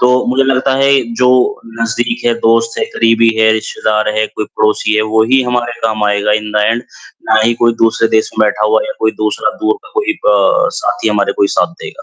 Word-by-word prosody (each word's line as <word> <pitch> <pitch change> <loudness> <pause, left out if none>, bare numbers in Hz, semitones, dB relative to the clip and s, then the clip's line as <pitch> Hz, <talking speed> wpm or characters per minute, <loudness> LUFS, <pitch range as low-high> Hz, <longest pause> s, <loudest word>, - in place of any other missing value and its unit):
तो 125 0 +3 0.2
मुझे 130 +2 +1
लगता 135 0 +1
है 135 0 +2 0.2
जो 125 +1 +2 0.5
नज़दीक 115 +1 -2
है, 120 - +2
दोस्त 115 0 +1
है, - - 0
करीबी 115 0 +3
है, 110 0 +4
रिश्तेदार 110 0 -1
है, 110 - +1
कोई 105 - -5
पड़ोसी 105 0 +1
है, 110 - +2
वो 110 - +4
ही 135 - +5
हमारे 125 -1 -2
काम 110 -1 0
आएगा 105 0 +1
इन 105 - -7
द 105 - +3
एंड, 115 +2 0 0.5
ना 110 0 +4
ही 120 - +2
कोई 115 - +4
दूसरे 115 0 +1
देश 110 - 0
में 110 - +4
बैठा 105 0 0
हुआ 110 +1 +2
या 270 - -4
कोई 110 - +1
दूसरा 105 -1 -1
दूर 405 +6 +1
का 420 - -15
कोई 410 -7 -1
प 100 -2 +3
साथी 105 +2 -1
हमारे 105 -1 0
कोई 100 - +4
साथ 165 - +1
देगा। - - -9
115 Hz, 220 wpm, -13 LUFS, 110-125 Hz, 0.5 s, ही